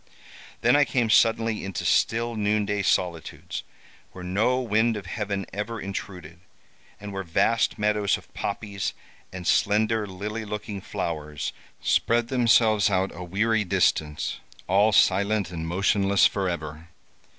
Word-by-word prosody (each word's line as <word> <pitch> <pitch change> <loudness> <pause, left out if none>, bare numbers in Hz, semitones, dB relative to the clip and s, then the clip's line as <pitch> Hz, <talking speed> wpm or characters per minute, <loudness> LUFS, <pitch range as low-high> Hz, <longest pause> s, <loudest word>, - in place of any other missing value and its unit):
Then - - +4
I 145 - +6
came 120 -5 0
suddenly 115 -1 +3
into 95 -2 -4
still 115 +1 +1
noonday 105 -1 0
solitudes, 85 -4 -2 0.5
where 90 - -9
no 105 +8 +1
wind 115 -1 +1
of 100 - -8
heaven 100 -1 -3
ever 105 +3 -4
intruded, 90 -4 -7 0.6
and 100 -1 -8
where 95 - -3
vast 95 +6 +1
meadows 105 -1 +1
of - - -18
poppies, 100 -2 -4 0.4
and 90 -1 -7
slender, 105 +2 +2
lily 105 +4 -5
looking 105 -1 -6
flowers 75 -4 -4 0.3
spread 120 0 +1
themselves 115 -4 +4
out 95 0 0
a 90 - -7
weary 110 +5 +1
distance, 75 -4 0 0.3
all 100 +4 +3
silent 100 0 +2
and 80 -2 -5
motionless 100 +2 +2
forever. 85 -4 -2
100 Hz, 130 wpm, -25 LUFS, 95-110 Hz, 0.6 s, I